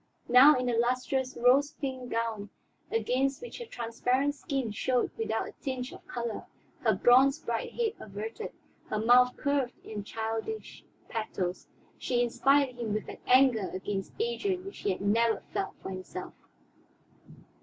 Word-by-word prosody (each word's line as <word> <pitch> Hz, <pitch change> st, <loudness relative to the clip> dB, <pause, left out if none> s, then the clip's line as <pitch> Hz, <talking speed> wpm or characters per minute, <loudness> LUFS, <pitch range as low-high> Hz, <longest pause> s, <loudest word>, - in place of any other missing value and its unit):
Now, 260 Hz, +5 st, +8 dB
in 250 Hz, -, -1 dB
the 245 Hz, -, +1 dB
lustrous 255 Hz, +2 st, 0 dB
rose 260 Hz, +4 st, +4 dB
pink 260 Hz, -3 st, -4 dB
gown 225 Hz, -3 st, -2 dB, 0.4 s
against 255 Hz, +5 st, 0 dB
which 485 Hz, -, -8 dB
her 475 Hz, -, -7 dB
transparent 250 Hz, -, 0 dB
skin 270 Hz, -5 st, -3 dB
showed 250 Hz, +4 st, 0 dB
without 450 Hz, -, -1 dB
a -, -, -10 dB
tinge 260 Hz, -2 st, -3 dB
of -, -, -14 dB
color, 235 Hz, -2 st, -4 dB, 0.3 s
her -, -, +2 dB
bronze 265 Hz, +4 st, +5 dB
bright 235 Hz, -8 st, -3 dB
head 460 Hz, -3 st, 0 dB
averted, 215 Hz, +2 st, -6 dB, 0.4 s
her -, -, -2 dB
mouth 245 Hz, +3 st, +5 dB
curved 280 Hz, -3 st, 0 dB
in 210 Hz, -2 st, -5 dB
childish 225 Hz, -, -4 dB, 0.2 s
pathos, 195 Hz, -5 st, -3 dB, 0.3 s
she 245 Hz, -1 st, +1 dB
inspired 270 Hz, +2 st, +2 dB
him 225 Hz, -3 st, -2 dB
with 215 Hz, -, -4 dB
an -, -, -7 dB
anger 250 Hz, -6 st, +5 dB
against 195 Hz, +1 st, -4 dB
Adrian 405 Hz, -5 st, -1 dB
which 395 Hz, -, -8 dB
he -, -, -1 dB
had 185 Hz, -, -4 dB
never 225 Hz, +3 st, +2 dB
felt 195 Hz, -, -2 dB
for -, -, -5 dB
himself. 185 Hz, 0 st, -7 dB
245 Hz, 150 wpm, -29 LUFS, 225-275 Hz, 0.4 s, Now